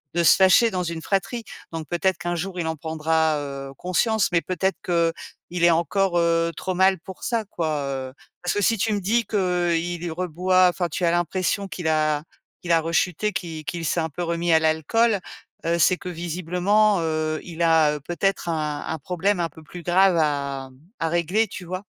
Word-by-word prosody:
de 175 - +3
se 165 - +7
fâcher 190 +5 +5
dans 185 -3 -2
une 165 -1 -4
fratrie. 200 +6 -1 0.3
Donc 160 -2 -5
peut-être 180 +1 0
qu'un 175 0 -2
jour 180 +1 -4
il 160 - -1
en 160 - -1
prendra, 160 0 0
heu, 140 -1 -6
conscience. 210 +4 +1
Mais 170 - +3
peut-être 185 +4 -1
qu'il 170 0 -2
est 170 - +7
encore, 175 +2 +1
heu, 170 0 +2
trop 185 +2 -3
mal 190 0 +4
pour 190 +2 -11
ça 230 -3 -1
quoi, 160 -6 -2
heu. 130 -1 -4 0.3
Parce 180 - 0
que 205 - 0
si 225 +3 +3
tu 215 +2 0
me 205 - 0
dis 225 +5 +1
que, 215 - -5 0.4
heu, - - +3
il 175 0 -3
reboit, 185 +2 +2
enfin 175 0 -1
tu 170 - -4
as 170 - +4
l'impression 180 +3 0
qu'il 175 -3 -5
a 155 -1 +2 0.4
qu'il 175 - -3
a 165 - +5
rechuté, 180 +5 0
qu'il 160 -3 -5
qu'il 170 +1 -4
s'est 170 - +1
un 160 - -2
peu 175 - -6
remis 170 0 0
à 160 - +6
l'alcool, 160 +9 +2 0.5
heu, 170 +1 +1
c'est 180 +3 +4
que 180 -2 -7
visiblement, 180 +4 +1
heu, 155 -1 -1
il 170 -1 -4
a, 160 -2 +4
heu, - - -5
peut-être 175 +4 -1
un 150 -2 -2
un 160 - -3
problème 180 +5 -1
un 170 -1 0
peu 160 +2 -15
plus 175 +3 -10
grave 180 +2 +4
à 140 -3 -2 0.3
à 165 -1 0
régler. 175 +6 +1
Tu 185 -1 -8
vois? 185 +3 -5
175 Hz, 205 wpm, -23 LUFS, 160-185 Hz, 0.5 s, se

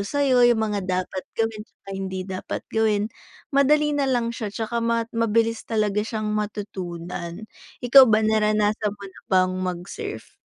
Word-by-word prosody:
sa'yo 255 +3 +3
yung 235 -2 +3
mga 205 -2 -1
dapat 185 0 -2
gawin 225 -1 -1
tsaka 210 -2 -16
hindi 190 -1 -4
dapat 190 -1 -5
gawin, 215 -2 +2 0.5
madali 295 +2 +4
nalang 260 -5 0
siya 225 -2 -4
tsaka 225 +3 -3
ma 230 0 +1
mabilis 230 0 +1
talaga 210 -2 +1
siyang 215 0 -3
matutunan. 180 -4 -5 0.4
Ikaw 265 +2 +9
ba, 215 0 +4
naranasan 215 -1 +1
mo 200 - -11
na 190 - -12
bang 185 -1 +3
mag-surf? 185 - -5
215 Hz, 145 wpm, -24 LUFS, 195-230 Hz, 0.5 s, Ikaw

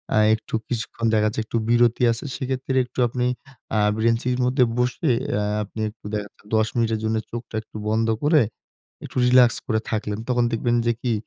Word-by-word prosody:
আ - - +3 0.2
একটু 110 - -13
কিছুক্ষণ 115 -1 -3
দেখা 105 -1 +3
যাচ্ছে 110 +1 -2
একটু 115 - -2
বিরতি 120 0 +3
আছে। 115 +4 -4
সেক্ষেত্রে 130 0 -2
একটু 125 +1 -9
আপনি 125 +1 -2 0.5
আ - - +3 0.2
বেঞ্চের 115 +2 +1
মধ্যে 125 +1 +3
বসে 125 +4 +1 0.3
আ - - 0 0.2
আপনি 105 +2 -10
একটু 105 -1 -19
দেখা 105 -1 -2
যাচ্ছে - - -28
১০ 110 0 +3
মিনিটের 115 -2 +1
জন্য 110 0 0 0.2
চোখটা 120 -1 -7
একটু 110 - -27
বন্ধ 110 +1 +1 0.2
করে, 150 0 +5 0.6
একটু - - -10
রিল্যাক্স 125 -1 +6
করে 110 -3 +1
থাকলেন। 105 -1 -2
তখন 120 -1 +2
দেখবেন 120 +1 +1
যে 120 - +4
কি? 125 - 0
115 Hz, 185 wpm, -23 LUFS, 110-125 Hz, 0.6 s, রিল্যাক্স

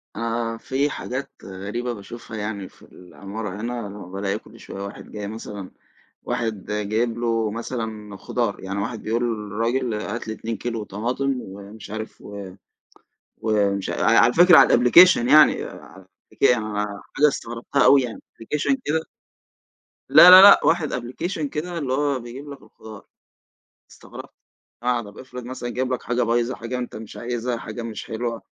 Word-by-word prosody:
آآ، 115 0 -2
في 135 +5 -1
حاجات 130 -1 -5
غريبة 105 +6 -5
باشوفها 110 +1 -9
يعني 105 -2 -5
في - - -25
العمارة 100 +2 -8
هنا، 120 -2 -4
اللي 100 +1 -9
هو 90 -3 -10
بالاقي 100 +1 -2
كل 115 +2 -17
شويّة 100 - -9
واحد 100 - -9
جاي 105 -1 -6
مثلًا 105 -3 -8 0.5
واحد 115 -5 -3
جايب 110 +3 -1
له 115 -2 0
مثلًا 110 -3 -5
خضار، 115 0 -2
يعني 100 +1 -4
واحد 115 +2 -4
بيقول 115 +2 -1
للراجل 115 +2 -1
هات 105 +2 -4
لي 110 - -3
2 115 -1 -5
كيلو 115 -3 -4
طماطم 125 +7 -2
ومش 100 +2 -11
عارف 110 0 -7 1.2
ومش 100 -3 0
ع - - -2 0.2
على 120 +1 +5
فكرة 175 0 +7
على - - +8
الأبليكيشن 125 +1 +6
يعني 150 +2 +6
آآ 95 -1 -12 0.3
أك - - -2 0.7
حاجة 150 - +5
استغربتها 120 0 -1
أوي 140 -1 +6
يعني 120 -3 -6
أبليكيشن 150 - -1
كده 160 +2 0 1.1
لا، 155 +6 +10
لا، 185 +1 +12
لأ، 200 0 +8
واحد 160 -2 +2
أبليكيشن 145 +6 -3
كده 170 +3 -4
اللي 135 -5 -2
هو 140 -1 0
بيجيب 130 +5 -9
لك 140 - -10
الخضار. 110 -2 -13 0.9
استغربت، - - -12 0.5
آه، 125 -1 +1
طب 105 -1 -12
أفرض 125 -1 -9
مثلًا 125 -1 -6
جاب 130 +1 -2
لك 125 - -4
حاجة 125 0 0
بايظة 120 +2 0
حاجة 115 +2 -5
أنت 125 - -6
مش 110 -1 -9
عايزها 120 0 -3
حاجة 110 +1 -7
مش 110 -3 -6
حلوة. 115 0 -4
115 Hz, 160 wpm, -23 LUFS, 105-125 Hz, 1.2 s, لا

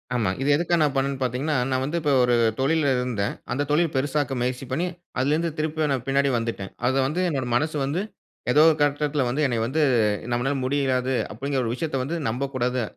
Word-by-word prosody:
ஆமா. 110 -5 +1
இத 135 - -1
எதுக்காக 175 +2 +1
நான் 145 -2 +2
பண்னேன்னு 135 0 0
பார்த்தீங்கன்னா, 130 +4 -1
நான் 130 0 0
வந்து 150 +5 -2
இப்ப 150 -2 +1
ஒரு 125 0 +3 0.2
தொழில்ல 145 +1 +2
இருந்தேன். 120 -5 -1 0.2
அந்த 145 - 0
தொழில் 160 +1 +2
பெருசாக்க 135 -1 0
முயற்சி 125 +1 -2
பண்ணி, 160 +7 0 0.3
அதிலிருந்து 155 +5 +1
திரும்பியும் 155 -1 -1
நான் 125 -2 -3
பின்னாடி 140 +1 +2
வந்துட்டேன். 115 -4 -4 0.2
அத 130 - +2
வந்து 160 +6 -1
என்னோட 135 -5 -2
மனசு 155 +3 -1
வந்து 160 +8 -1 0.5
ஏதோ 150 +4 +5
ஒரு 160 - +2
கட்டத்தில 145 0 +1
வந்து 135 +5 -1
என்ன 125 -4 0
வந்து 155 +5 0 0.5
நம்மனால 135 +4 0
முடியாது 130 -1 0 0.2
அப்டிங்கிற 135 +3 -2
ஒரு 115 - -1
விஷயத்த 155 +1 -3
வந்து 155 +6 -3
நம்பக்கூடாது. 125 0 -1
135 Hz, 185 wpm, -24 LUFS, 125-150 Hz, 0.5 s, ஏதோ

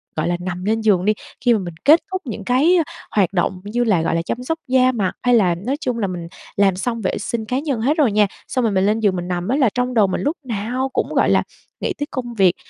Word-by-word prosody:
gọi 155 - -1
là, 175 0 0
nằm 180 0 -5
lên 220 +2 +1
giường 195 -4 +2
đi, 215 - +4 0.3
khi 240 - +6
mà 220 - +2
mình 175 -3 -6
kết 310 +4 +8
thúc 375 0 -2
những 220 -4 -5
cái 275 - +3 0.4
hoạt 200 -2 +2
động 180 0 0
như 225 +4 -1
là, 205 -8 +2
gọi 165 - 0
là, 165 - +1
chăm 240 +8 -4
sóc 325 +6 -2
da 255 0 +4
mặt, 210 -7 -1
hay 245 0 +4
là 185 -6 +3
nói 240 +11 -3
chung 245 -2 -2
là 205 - 0
mình 175 -2 -5 0.3
làm 195 -2 +3
xong 230 +4 -3
vệ 185 - -1
sinh 220 +2 -3
cá 250 +4 -1
nhân 275 -6 -2
hết 290 +7 +1
rồi 280 -8 +3
nha. 210 0 +3 0.2
Xong 255 - -1
rồi 225 - +2
mình 190 -1 +2
lên 215 +2 +2
giường 205 -4 +2
mình 175 -1 -4
nằm 180 0 -2
á 250 - +1
là 270 -5 +3
trong 250 0 -1
đầu 215 -4 +4
mình 185 - -2
lúc 295 +5 -1
nào 245 +3 -2
cũng, - - -1
gọi - - +3
là, - - +3 0.4
nghĩ - - -1
tới 290 - -2
công 245 -3 -4
việc, 190 -5 +3
220 Hz, 280 wpm, -20 LUFS, 190-250 Hz, 0.4 s, kết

